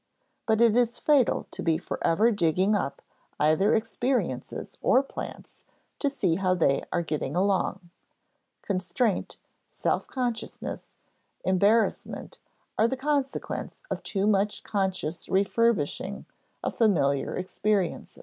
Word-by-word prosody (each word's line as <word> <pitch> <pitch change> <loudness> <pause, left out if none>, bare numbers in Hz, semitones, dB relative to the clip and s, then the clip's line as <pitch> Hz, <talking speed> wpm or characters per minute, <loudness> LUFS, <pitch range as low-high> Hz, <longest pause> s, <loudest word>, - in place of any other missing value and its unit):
But 220 0 +3
it 230 -2 +5
is 240 -1 +2
fatal 285 -5 +3
to - - -7
be 165 -2 +2
forever 215 +10 +1
digging 190 +1 +2
up 190 -8 -2 0.4
either 155 +7 +4
experiences 240 +3 -2
or 260 - +4
plants - - -8 0.4
to 285 - +1
see 180 -12 0
how 185 -1 +2
they 140 -6 +2
are 175 - 0
getting 150 -2 -3
along. 185 -2 0 0.7
Constraint, 190 +3 -1 0.3
self - - -1
consciousness, 245 -4 -4 0.5
embarrassment, 200 +5 +1 0.4
are 220 - +5
the 265 - -2
consequence 280 - -2
of - - -2
too 195 -1 -1
much 205 0 +1
conscious 190 -5 -2
refurbishing 200 -2 +1 0.4
of - - -2
familiar 145 - +2
experiences. 190 0 -1
200 Hz, 115 wpm, -27 LUFS, 180-230 Hz, 0.7 s, it